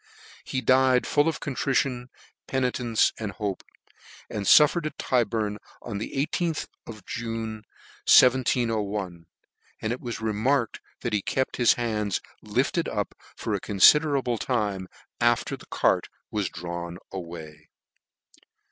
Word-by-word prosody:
He 130 - -3
died 130 -1 +4
fall 145 +1 +2
of 165 - -1
contrition, 130 -3 -1 0.4
penitence, 125 -3 +1
and 105 -3 -4
hope; 100 -1 -3 0.7
and 105 -2 -3
fuftercd 155 +2 +6
at - - -8
Tyburn, 110 -4 0 0.2
on 100 - -5
the 110 - -5 0.2
IStk 170 -3 -1 0.2
of 110 -5 -10
June, 115 -1 -4 0.5
1/01; 110 -8 +3 0.5
and 110 +2 -1
it 125 - -7
was 120 -1 -5
remarked 115 +3 0 0.2
that 120 - -3
he 105 - +2
kept 130 +6 -1
his 120 -2 +5
hands 105 -4 -1 0.2
lifted - - 0
up - - -2 0.2
for - - -3
a - - 0
considerable 135 +3 +4
time 105 -7 -1 0.3
after - - +2
the - - -16
cart - - +1 0.2
was 105 -5 -1
drawn 85 +1 -6 0.2
5 95 - -4
way. 80 -3 -10
115 Hz, 130 wpm, -26 LUFS, 100-130 Hz, 0.7 s, fuftercd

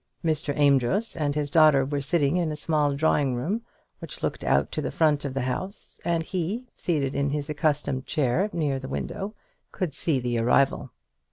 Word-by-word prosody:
Mr. 155 -2 +1
Amedroz 145 - +2
and 145 -2 -1
his 145 -1 -2
daughter 155 -5 +6
were 140 +1 -2
sitting 145 +1 +1
in 170 -3 0
a - - -3
small 150 -2 +1
drawing 140 -3 +2
room, 180 - -2 0.4
which - - -9
looked - - -2
out - - +2
to - - -2
the - - -2
front 150 -3 +2
of 135 -2 -4
the 135 - 0
house 185 +11 -5
and 170 -1 0
he, 190 +8 -3
seated 145 -6 -1
in 140 0 0
his 150 +1 -2
accustomed 150 -3 -1
chair, 155 - +1
near 150 -6 -1
the 130 - -7
window, 195 +9 -4 0.4
could 175 -6 -3
see 150 -2 0
the 120 -1 -1
arrival. 125 +4 +2
150 Hz, 185 wpm, -26 LUFS, 140-165 Hz, 0.4 s, daughter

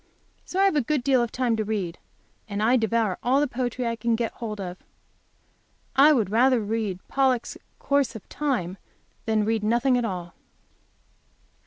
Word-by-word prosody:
So 370 - -3
I 390 - +5
have 390 - +3
a 295 - +3
good 280 +1 -1
deal 260 -2 +3
of 235 -1 -2
time 245 -3 0
to 215 - 0
read, 200 -5 -3 0.5
and 205 +1 -2
I 240 +3 +4
devour 225 -4 +1
all 260 +3 +2
the 295 - +2
poetry 250 -1 -3
I 230 0 -1
can 230 +1 0
get 230 -1 -2
hold 215 -3 -6
of. 180 -1 -6 1.2
I 285 +3 +7
would 220 -9 +1
rather 250 +3 +4
read 215 -3 -2
"Pollok's 260 -3 +1 0.2
Course 280 -5 0
of 220 - -10
Time" 225 - -2 0.5
than 215 -1 +2
read 220 -1 0
nothing 240 +4 +2
at - - -1
all. 180 -5 -4
230 Hz, 175 wpm, -25 LUFS, 215-260 Hz, 1.2 s, I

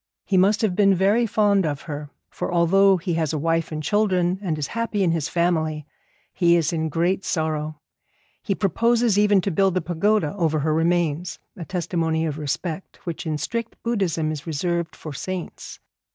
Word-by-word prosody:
He 195 - 0
must 195 +4 +3
have 195 -5 +1
been 195 -1 +4
very 205 +6 +3
fond 205 -2 +3
of 145 -3 -3
her, 150 -2 -6 0.2
for - - -4
although 190 +3 +4
he 175 0 -3
has 160 -2 0
a - - 0
wife 165 +2 0
and 155 0 -4
children, 190 -2 +1
and 170 -6 -2
is 150 - -2
happy 230 -3 -1
in 175 - +2
his 160 -3 -1
family, 160 -3 0 0.5
he 170 -2 +4
is 165 -1 +1
in 160 -1 -1
great 175 +5 0
sorrow. 155 -2 -2 0.6
He 195 - -1
proposes 230 +3 +2
even 205 -2 +4
to 195 - -2
build 190 +2 +2
a - - +1
pagoda 175 0 +1
over 160 -5 0
her 155 +1 +1
remains, 170 0 0 0.2
a 170 - -7
testimony 165 -3 -1
of 155 -1 -3
respect 160 +5 -5
which 170 0 -5
in 155 -1 -1
strict 230 +8 -4
Buddhism 185 -9 0
is 155 +1 -6
reserved 170 +1 -2
to 155 - -7
saints. 185 +5 -6
170 Hz, 180 wpm, -23 LUFS, 160-195 Hz, 0.6 s, been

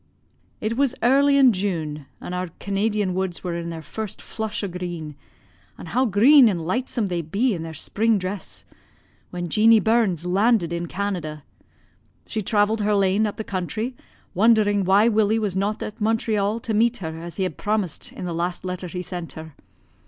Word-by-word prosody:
"It 220 +2 -2
was 270 -2 +2
early 280 +3 +5
in 260 -4 +6
June, 160 -7 -3
and 180 - -7
our 180 0 -2
Canadian 200 -1 0
woods 185 -1 -3
were 180 -2 -2
in 170 0 -4
their 165 -1 -6
first 215 +2 -5
flush 220 -1 -4
o' - - 0
green 175 -4 -5 0.6
an' - - -9
how 245 +10 +1
green 245 +5 +6
an' 190 - -1
lightsome 210 +6 -1
they 175 -2 -2
be 205 +10 0
in 170 - -4
their 160 -1 -7
spring 220 +7 +1
dress 190 +1 -5 0.6
when 175 -1 -4
Jeanie 220 +6 +5
Burns 215 -7 +1
landed 190 -1 +2
in 170 0 -3
Canada. 175 -6 -4 0.8
She 220 - -3
travelled 210 +2 +1
her 210 0 +2
lane 200 +2 +2
up 205 - -6
the 220 - -3
country, 215 +6 -3 0.4
wondering 205 -1 +3
why 200 +4 +5
Willie 220 -1 +3
was 210 -4 -1
not 200 +3 -1
at 210 - -8
Montreal 215 -1 +1
to 220 - -3
meet 235 +3 +2
her 160 -3 -6
as 170 +1 -7
he 190 - -1
had 185 - -3
promised 210 -6 -2
in - - -7
the 175 - -3
last 175 +2 -3
letter 180 0 -4
he 180 +1 -5
sent 175 -1 -6
her. 160 -1 -9
200 Hz, 180 wpm, -23 LUFS, 175-220 Hz, 0.8 s, in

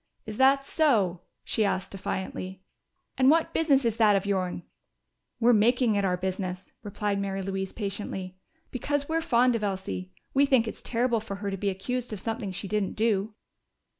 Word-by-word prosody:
"Is 215 -1 -6
that 275 +1 +4
so?" 215 - +2 0.2
she 220 - 0
asked 190 -2 -1
defiantly. 190 -1 -5 0.6
"And 260 0 +6
what 325 +2 +3
business 280 -5 +3
is 230 -1 +1
that 215 -2 +5
of 195 0 0
your'n?" 185 -3 -1 0.8
"We're 240 +1 +5
making 235 +2 +4
it 200 -1 +1
our 180 -2 +1
business," 185 0 -4
replied 205 -1 -2
Mary 195 -1 -2
Louise 190 0 -3
patiently, 195 -3 -5 0.4
"because 285 +2 -1
we're 325 +1 0
fond 245 -3 +3
of 220 - -2
Elsie. 95 - -3 0.2
We 280 +1 +4
think 255 -4 +3
it's - - -6
terrible 235 -1 +1
for 210 -2 -6
her 200 0 -4
to - - -2
be 200 +1 0
accused 230 +5 -3
of 210 - -5
something 225 -1 -3
she 195 +2 -5
didn't 210 -1 -1
do." 210 -1 0
210 Hz, 175 wpm, -27 LUFS, 190-245 Hz, 0.8 s, And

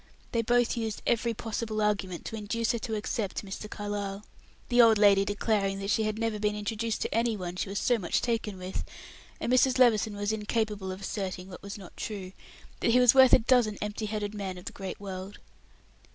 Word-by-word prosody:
They 230 - +1
both 245 +2 +2
used 225 -3 -3
every 235 0 +1
possible 220 0 -3
argument 200 -4 -1
to - - -5
induce 220 +2 -1
her 235 - -2
to 220 +1 -3
accept 210 -1 -3
Mr. 200 +2 -7
Carlyle: 205 -1 -4 0.4
the 245 0 +5
old 225 -2 +6
lady 200 -1 +6
declaring 205 -1 0
that 195 +1 -2
she 220 - +2
had 215 0 -1
never 225 -2 -1
been 210 0 0
introduced 215 +2 -2
to - - -3
any 230 -1 +1
one 180 -2 -5
she 185 - -3
was 200 - -3
so 240 +2 +2
much 180 - 0
taken 225 -4 -2
with, 185 +1 -4 0.6
and 245 - 0
Mrs. 255 0 +4
Levison 220 -4 +4
was 205 +1 -1
incapable 210 -2 -2
of 185 +1 -7
asserting 190 -2 -4
what 180 - -10
was 200 +1 -7
not 190 -3 -12
true; 195 -4 -5 0.5
that - - +1
he 245 +2 +5
was 250 -2 +7
worth 265 -1 +7
a - - +11
dozen 230 -3 +2
empty 210 +1 -3
headed 210 -1 -3
men 195 -3 -4
of 180 - -11
the - - -5
great 190 -1 -6
world. 195 0 -7
210 Hz, 210 wpm, -29 LUFS, 195-230 Hz, 0.6 s, a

